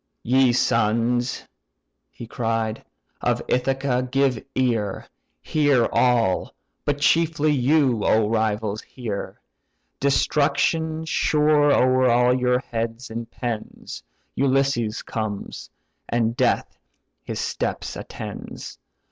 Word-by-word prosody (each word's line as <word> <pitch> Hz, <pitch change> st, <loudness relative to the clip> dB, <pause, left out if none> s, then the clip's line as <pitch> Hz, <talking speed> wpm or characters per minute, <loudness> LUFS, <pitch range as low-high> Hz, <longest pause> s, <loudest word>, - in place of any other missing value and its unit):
"Ye 130 Hz, +1 st, +4 dB
sons 120 Hz, +1 st, +1 dB, 0.7 s
(he -, -, -10 dB
cried) 115 Hz, -1 st, -2 dB, 0.4 s
of -, -, +1 dB
Ithaca, 130 Hz, 0 st, 0 dB
give 135 Hz, -3 st, +1 dB
ear; 115 Hz, -6 st, 0 dB, 0.4 s
Hear 145 Hz, -6 st, +2 dB
all! 115 Hz, -5 st, +2 dB, 0.3 s
but 145 Hz, -1 st, 0 dB
chiefly 155 Hz, 0 st, +2 dB
you, 135 Hz, -4 st, +2 dB
O 110 Hz, -1 st, +3 dB
rivals! 110 Hz, -1 st, -1 dB
hear. 110 Hz, -6 st, -6 dB, 0.6 s
Destruction 155 Hz, +3 st, +1 dB
sure 150 Hz, -2 st, +3 dB
o'er 130 Hz, -1 st, +4 dB
all 125 Hz, +1 st, +4 dB
your 125 Hz, -1 st, +2 dB
heads 115 Hz, +1 st, -4 dB
impends 115 Hz, 0 st, -6 dB, 0.3 s
Ulysses 135 Hz, -5 st, +1 dB
comes, 110 Hz, -3 st, -5 dB, 0.4 s
and 115 Hz, -1 st, 0 dB
death -, -, 0 dB, 0.4 s
his -, -, -5 dB
steps -, -, -3 dB
attends. -, -, -8 dB
125 Hz, 95 wpm, -23 LUFS, 115-135 Hz, 0.7 s, Ye